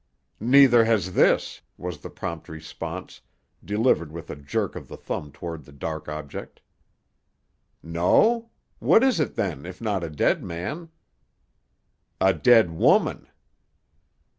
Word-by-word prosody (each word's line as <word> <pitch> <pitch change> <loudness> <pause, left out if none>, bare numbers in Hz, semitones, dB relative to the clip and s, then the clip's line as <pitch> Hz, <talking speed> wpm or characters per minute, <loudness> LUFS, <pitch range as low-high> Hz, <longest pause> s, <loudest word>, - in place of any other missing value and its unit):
"Neither 125 0 +6
has 100 -6 +1
this," - - +2 0.2
was 90 -4 -6
the - - -9
prompt 85 -2 -6
response, 80 -1 -8 0.4
delivered 105 -7 +1
with 85 +1 -8
a - - -6
jerk 70 0 -3
of - - -8
the - - -10
thumb 75 - -5
toward 80 +1 -7
the 70 - -17
dark 80 +2 -6
object. 75 -2 -7 1.2
"No? 215 - +2 0.3
What 225 - +5
is 265 -8 +3
it 150 - -1
then, 70 - -2
if 90 +1 -9
not 105 -5 -2
a 85 - -4
dead 75 - +1
man?" 145 - -5 1.3
"A 95 0 +4
dead 115 -8 +5
woman." 80 - +2
90 Hz, 130 wpm, -25 LUFS, 80-120 Hz, 1.3 s, Neither